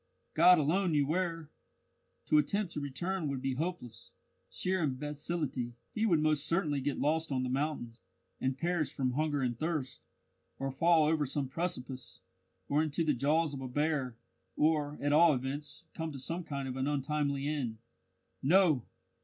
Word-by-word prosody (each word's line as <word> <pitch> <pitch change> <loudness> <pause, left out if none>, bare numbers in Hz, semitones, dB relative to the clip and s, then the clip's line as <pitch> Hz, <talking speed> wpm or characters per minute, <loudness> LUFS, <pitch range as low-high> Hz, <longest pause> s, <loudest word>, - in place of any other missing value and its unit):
God 175 +3 +7
alone 170 +4 +2
knew 145 -2 +3
where! 165 -1 -2 0.7
To 150 - +5
attempt 195 +5 0
to - - -3
return 160 +5 -2
would 140 -2 -2
be 135 0 -1
hopeless 130 -6 -5 0.4
sheer 185 0 -1
imbecility; 145 -3 -2 0.2
he 220 +1 +1
would 170 -6 +4
most 155 -1 +1
certainly 155 -5 +1
get 145 +1 -1
lost 160 +1 0
on 130 -1 0
the 125 - -2
mountains, 130 -4 -2 0.4
and 130 0 -1
perish 170 -1 0
from 130 -2 -1
hunger 145 0 0
and 120 -2 -1
thirst, 155 -5 -2 0.6
or 135 0 -2
fall 165 +3 +4
over 150 -2 +2
some 135 +1 -1
precipice, 130 -4 -4 0.5
or 145 +2 +2
into 160 +1 0
the 150 - +3
jaws 150 +4 +1
of 135 - -5
a 130 - -4
bear; 140 -2 0 0.4
or, 150 -1 +1
at 145 0 +1
all 160 -1 +6
events, 145 +5 -5
come 160 -1 -4
to 140 - -7
some 165 +7 -3
kind 140 -3 -4
of 130 - -4
an 130 +1 0
untimely 145 0 -1
end. 135 -7 -2 0.6
No! 155 - +4
150 Hz, 165 wpm, -32 LUFS, 135-160 Hz, 0.7 s, God